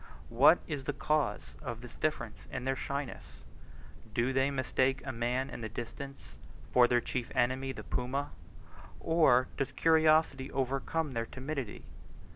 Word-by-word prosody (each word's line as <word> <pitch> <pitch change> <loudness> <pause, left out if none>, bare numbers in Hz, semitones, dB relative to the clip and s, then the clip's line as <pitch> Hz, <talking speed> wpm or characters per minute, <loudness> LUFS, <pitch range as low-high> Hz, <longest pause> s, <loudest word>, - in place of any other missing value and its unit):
What 140 +8 +7
is 145 -4 -4
the 145 - -1
cause 150 -1 0
of 120 -5 -5
this 125 -1 -10
difference 150 -8 -3
in 125 - -4
their 135 0 +1
shyness? 140 0 -5 0.7
Do 120 +3 +1
they 135 +1 +3
mistake 130 0 0
a 130 - -2
man 125 +3 -1
in - - -7
the 110 - -4
distance 120 +5 -8 0.4
for 125 -1 +7
their 120 0 +3
chief 125 -1 -3
enemy 130 +2 +1
the - - -8
puma? 135 +4 -2 0.7
Or 135 -7 +4
does 135 - -2
curiosity 155 -4 +3
overcome 135 +4 -1
their 115 -2 -2
timidity? 135 -4 -5
130 Hz, 145 wpm, -32 LUFS, 125-140 Hz, 0.7 s, What